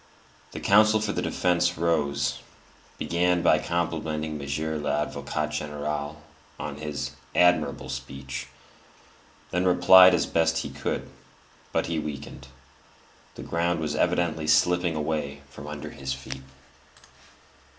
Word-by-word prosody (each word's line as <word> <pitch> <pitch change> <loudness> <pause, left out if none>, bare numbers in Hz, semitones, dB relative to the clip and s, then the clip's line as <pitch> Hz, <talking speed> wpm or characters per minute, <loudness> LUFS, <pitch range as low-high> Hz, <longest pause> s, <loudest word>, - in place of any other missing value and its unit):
The - - -6
counsel 110 +2 +5
for 105 -1 -1
the - - -2
defence 90 -1 +1
rose, 70 -4 0 0.6
began 85 +2 +1
by 80 - +5
complimenting 80 -2 -2
Monsieur 75 +2 -3
l'Avocat 75 +1 -2
General 75 0 -4 0.4
on 75 -1 -5
his 75 -1 -4 0.2
"admirable 90 0 +3
speech," 70 0 -6 1.0
then 90 +1 +1
replied 90 0 +8
as - - +1
best 80 0 +1
he 70 - -5
could; 70 +1 -3 0.6
but - - 0
he 85 -1 -1
weakened; 75 -2 -7 0.9
the - - -8
ground 85 0 0
was 75 -2 -2
evidently 80 -2 0
slipping 85 +3 +3
away 75 -2 -3
from 70 - -10
under 75 -1 -6
his 65 0 -4
feet. 65 0 -8
75 Hz, 120 wpm, -26 LUFS, 70-85 Hz, 1.0 s, replied